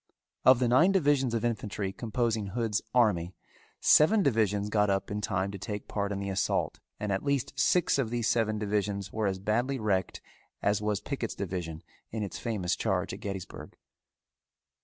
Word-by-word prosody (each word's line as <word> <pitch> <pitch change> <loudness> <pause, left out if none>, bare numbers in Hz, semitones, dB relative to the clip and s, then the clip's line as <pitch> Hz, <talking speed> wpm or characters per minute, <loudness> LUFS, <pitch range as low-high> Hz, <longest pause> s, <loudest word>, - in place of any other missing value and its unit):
Of 130 -1 +7
the 125 0 +1
nine 130 +11 +5
divisions 145 -9 +2
of 115 0 -1
infantry 105 -4 -2
composing 115 -2 -1
Hood's 110 +1 -1
army, 95 -8 +2 0.4
seven 195 +7 +5
divisions 105 - +1
got 105 -1 +2
up 95 +1 -1
in 105 0 -2
time 100 -1 -1
to 100 - -7
take 105 +3 -5
part 100 -1 -2
in 100 - -2
the 100 0 -3
assault 95 - -1 0.2
and 105 -1 -2
at 95 - 0
least 140 -1 0
six 140 +3 +2
of 120 -5 0
these 120 -1 -1
seven 110 -2 +1
divisions 100 -2 -2
were 110 -2 0
as 95 -1 -1
badly 115 +8 0
wrecked 95 -4 0 0.4
as 100 0 +1
was 105 -1 -1
Pickett's 125 -2 -4
division 85 -4 -4 0.3
in 110 -1 -3
its 100 - -5
famous 105 -7 -1
charge - - -1
at - - -7
Gettysburg. 95 -2 -7
105 Hz, 175 wpm, -29 LUFS, 100-120 Hz, 0.4 s, Of